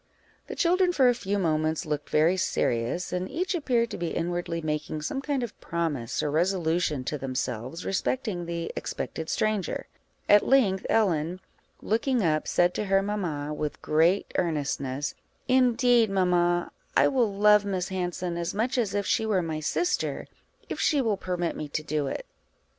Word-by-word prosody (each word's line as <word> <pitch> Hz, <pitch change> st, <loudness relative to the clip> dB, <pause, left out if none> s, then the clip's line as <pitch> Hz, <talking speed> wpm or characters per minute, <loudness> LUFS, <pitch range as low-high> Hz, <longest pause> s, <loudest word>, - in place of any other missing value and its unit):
The -, -, -6 dB
children 360 Hz, +1 st, +3 dB
for 265 Hz, -7 st, +4 dB
a -, -, +4 dB
few 205 Hz, -4 st, -2 dB
moments 155 Hz, -3 st, 0 dB
looked 150 Hz, -1 st, -3 dB
very 160 Hz, +4 st, +3 dB
serious, 125 Hz, -2 st, -1 dB
and 180 Hz, +1 st, -2 dB
each 365 Hz, +3 st, -2 dB
appeared 245 Hz, -8 st, +1 dB
to -, -, -5 dB
be 170 Hz, -, -1 dB
inwardly 170 Hz, 0 st, -2 dB
making 155 Hz, -1 st, -3 dB
some 270 Hz, -, -2 dB
kind 280 Hz, -3 st, -1 dB
of 235 Hz, -, -7 dB
promise 155 Hz, -8 st, -2 dB
or 145 Hz, -, -1 dB
resolution 165 Hz, -3 st, +1 dB
to 150 Hz, +3 st, -3 dB
themselves 130 Hz, +3 st, -4 dB
respecting 195 Hz, -3 st, -1 dB
the 170 Hz, -1 st, -3 dB
expected 160 Hz, 0 st, -4 dB
stranger: 215 Hz, -3 st, -1 dB, 0.4 s
at 205 Hz, 0 st, +6 dB
length, 205 Hz, -9 st, +3 dB
Ellen, 180 Hz, -5 st, +1 dB, 0.4 s
looking 230 Hz, +2 st, +1 dB
up, 155 Hz, -2 st, +1 dB
said 175 Hz, 0 st, +3 dB
to 210 Hz, -, -2 dB
her 195 Hz, 0 st, +3 dB
mamma, 165 Hz, -8 st, -2 dB
with 150 Hz, -1 st, -4 dB
great 165 Hz, +5 st, +2 dB
earnestness 145 Hz, -4 st, -2 dB, 0.3 s
"Indeed, 245 Hz, -2 st, +4 dB
mamma, 175 Hz, -2 st, +2 dB, 0.3 s
I -, -, +6 dB
will 245 Hz, -6 st, +2 dB
love 210 Hz, +1 st, +5 dB
Miss 190 Hz, -3 st, -2 dB
Hanson 180 Hz, -1 st, -3 dB
as 170 Hz, +2 st, -3 dB
much 245 Hz, +5 st, 0 dB
as 205 Hz, -4 st, -1 dB
if 200 Hz, -1 st, 0 dB
she 220 Hz, +3 st, +1 dB
were 195 Hz, -5 st, +2 dB
my 160 Hz, -2 st, -3 dB
sister, 350 Hz, -, -1 dB, 0.4 s
if -, -, -5 dB
she 300 Hz, -3 st, +3 dB
will 225 Hz, -6 st, +1 dB
permit 180 Hz, -3 st, -2 dB
me 150 Hz, -, -5 dB
to 150 Hz, +1 st, -3 dB
do 150 Hz, -2 st, -1 dB
it." -, -, -4 dB
180 Hz, 165 wpm, -27 LUFS, 155-215 Hz, 0.4 s, at